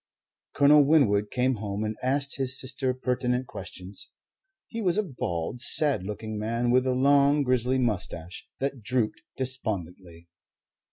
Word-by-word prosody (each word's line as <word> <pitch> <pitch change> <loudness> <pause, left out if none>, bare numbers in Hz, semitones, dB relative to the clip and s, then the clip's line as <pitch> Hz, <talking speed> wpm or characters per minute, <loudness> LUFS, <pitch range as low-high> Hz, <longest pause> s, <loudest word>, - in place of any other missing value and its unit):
Colonel 145 +1 +6
Winwood 115 -9 +3
came 125 0 +1
home 100 0 -3
and 110 0 -2
asked 140 +2 0
his 130 -1 -1
sister 130 0 -2
pertinent 125 0 -1
questions. 95 -2 -9 0.6
He 230 - -5
was 185 -2 +2
a 215 - +2
bald, 120 - -4
sad 140 - +2
looking 105 +2 -5
man 115 +3 0
with 130 +1 +3
a 130 - +1
long 140 +2 +4
grizzling 125 0 +1
moustache 90 -5 -4
that 135 -2 -2
drooped 120 0 -1 0.2
despondently. 95 -9 -4
125 Hz, 135 wpm, -27 LUFS, 105-135 Hz, 0.6 s, Colonel